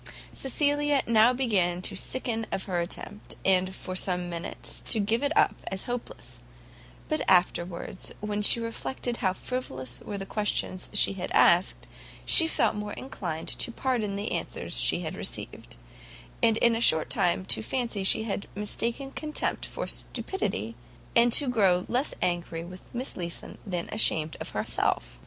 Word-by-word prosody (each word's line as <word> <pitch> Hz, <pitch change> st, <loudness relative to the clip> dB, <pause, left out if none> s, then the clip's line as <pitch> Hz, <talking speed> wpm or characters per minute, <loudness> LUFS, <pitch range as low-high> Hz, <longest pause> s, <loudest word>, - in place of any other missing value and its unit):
Cecilia 290 Hz, +1 st, +2 dB
now 230 Hz, +1 st, +5 dB
began 200 Hz, -9 st, +1 dB
to -, -, -1 dB
sicken 225 Hz, -3 st, 0 dB
of 190 Hz, -, -1 dB
her 180 Hz, -2 st, -1 dB
attempt, 195 Hz, +4 st, -5 dB
and 185 Hz, 0 st, +3 dB
for 185 Hz, -, -6 dB
some 180 Hz, -1 st, 0 dB
minutes 170 Hz, 0 st, -5 dB
to 225 Hz, -, +4 dB
give 220 Hz, +3 st, +1 dB
it 285 Hz, 0 st, +1 dB
up -, -, +5 dB
as 190 Hz, 0 st, -2 dB
hopeless; 245 Hz, 0 st, -5 dB, 0.7 s
but -, -, 0 dB
afterwards 175 Hz, 0 st, +1 dB
when 210 Hz, 0 st, -2 dB
she 210 Hz, -, +7 dB
reflected 235 Hz, +1 st, -3 dB
how 185 Hz, -2 st, +1 dB
frivolous 130 Hz, -, -5 dB
were 205 Hz, -, -5 dB
the 195 Hz, -, -5 dB
questions 195 Hz, -2 st, -1 dB
she 205 Hz, -, +4 dB
had 185 Hz, -2 st, -5 dB
asked, 175 Hz, +2 st, +4 dB, 0.4 s
she 325 Hz, -, +6 dB
felt 320 Hz, -, +2 dB
more 210 Hz, -1 st, -4 dB
inclined 175 Hz, -11 st, -5 dB
to -, -, 0 dB
pardon 230 Hz, -5 st, -1 dB
the 200 Hz, +1 st, -3 dB
answers -, -, -3 dB
she -, -, +2 dB
had -, -, -4 dB
received, -, -, -5 dB, 0.7 s
and 225 Hz, -1 st, +4 dB
in 235 Hz, 0 st, +4 dB
a 225 Hz, -, -1 dB
short 160 Hz, -8 st, +5 dB
time 180 Hz, +1 st, +1 dB
to -, -, 0 dB
fancy 230 Hz, -4 st, -2 dB
she 195 Hz, -, +3 dB
had 205 Hz, -2 st, -3 dB
mistaken 235 Hz, +6 st, -2 dB
contempt 305 Hz, +1 st, -1 dB
for -, -, -4 dB
stupidity, 190 Hz, -, -2 dB, 0.4 s
and 235 Hz, +1 st, +6 dB
to 285 Hz, +3 st, +6 dB
grow 195 Hz, -7 st, +3 dB
less 255 Hz, +5 st, +1 dB
angry 175 Hz, -2 st, -1 dB
with 180 Hz, +2 st, -12 dB
Miss 250 Hz, +2 st, -3 dB
Leeson 170 Hz, -2 st, -5 dB
than 175 Hz, -3 st, -2 dB
ashamed 160 Hz, -7 st, +2 dB
of -, -, -4 dB
herself. -, -, -1 dB
205 Hz, 160 wpm, -28 LUFS, 180-240 Hz, 0.7 s, she